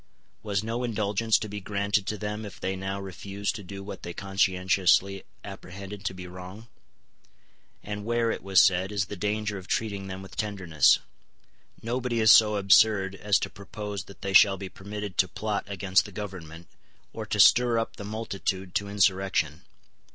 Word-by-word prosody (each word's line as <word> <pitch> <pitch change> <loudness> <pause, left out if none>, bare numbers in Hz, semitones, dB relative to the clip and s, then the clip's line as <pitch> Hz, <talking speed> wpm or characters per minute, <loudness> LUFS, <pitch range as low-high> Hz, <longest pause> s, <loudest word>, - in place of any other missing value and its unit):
Was 100 -1 -1
no 115 +3 -3
indulgence 110 -1 +1
to 110 - -5
be 105 0 -6
granted 100 0 -1
to 105 - -2
them 105 +1 -4
if 105 - -9
they 95 0 -2
now 95 +1 -4
refused 100 +1 -4
to 105 - -8
do 100 +1 -8
what 100 - -8
they 85 - -6
conscientiously 95 0 +1 0.2
apprehended 100 +1 -9
to 95 - -2
be 90 0 -8
wrong? 90 +5 -10 1.2
And 105 0 -5
where, 115 +1 +1
it - - -4
was 95 -1 +4
said, 95 +1 +1
is 100 -1 0
the 105 - -7
danger 105 +1 -2
of 95 - -13
treating 100 -3 -2
them 95 0 -7
with 95 - -12
tenderness? 95 -8 +3 0.9
Nobody 120 0 -1
is 110 -1 +7
so 105 -2 +7
absurd 100 0 +4
as 100 0 +2
to - - -2
propose 100 0 -7
that 100 - -14
they 100 0 -2
shall 95 0 +7
be 95 0 -7
permitted 105 -1 -7
to 95 - +5
plot 105 +3 -3
against 100 -1 +1
the 105 - -9
Government, 90 -5 -8 0.5
or - - -6
to - - -2
stir 120 -1 +6
up 115 - -2
the - - -7
multitude 100 -3 -4
to 100 0 -1
insurrection. 95 -5 +1
100 Hz, 175 wpm, -27 LUFS, 95-105 Hz, 1.2 s, is